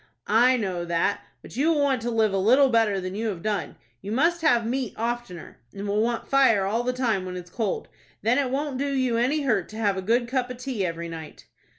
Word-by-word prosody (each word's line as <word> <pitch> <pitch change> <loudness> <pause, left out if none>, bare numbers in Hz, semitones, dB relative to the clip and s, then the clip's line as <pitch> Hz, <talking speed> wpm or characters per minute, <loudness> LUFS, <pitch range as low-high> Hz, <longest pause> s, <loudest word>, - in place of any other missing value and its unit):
"I 245 +4 +4
know 185 -6 -2
that, 170 +4 0 0.2
but - - -12
you 285 +6 +2
will 310 - +1
want 270 -4 +1
to 240 - -2
live 220 -3 +2
a - - +1
little 260 +8 +5
better 225 -4 +2
than 185 0 -5
you 220 +3 -2
have 185 -6 -4
done. 210 -2 -2 0.3
You 200 - -6
must 330 +8 +2
have 240 -8 +3
meat 250 -1 -2
oftener, 230 -6 -5 0.2
and 200 +1 -5
will 205 +1 +1
want 235 +1 -1
fire 260 -8 +4
all 220 +4 0
the 250 +1 0
time 240 -7 0
when 180 0 -5
it's 180 0 -9
cold. 215 -2 -2 0.4
Then 235 +5 +3
it 270 -3 0
won't 275 0 -2
do 280 0 -1
you 255 -4 +1
any 265 +6 +1
hurt 220 -9 0
to 215 - -9
have 205 -3 +1
a - - -2
good 235 +5 +1
cup 255 0 -1
of 250 - -6
tea 250 -5 -3
every 170 -1 -3
night." 160 -2 -9
230 Hz, 240 wpm, -25 LUFS, 200-255 Hz, 0.4 s, little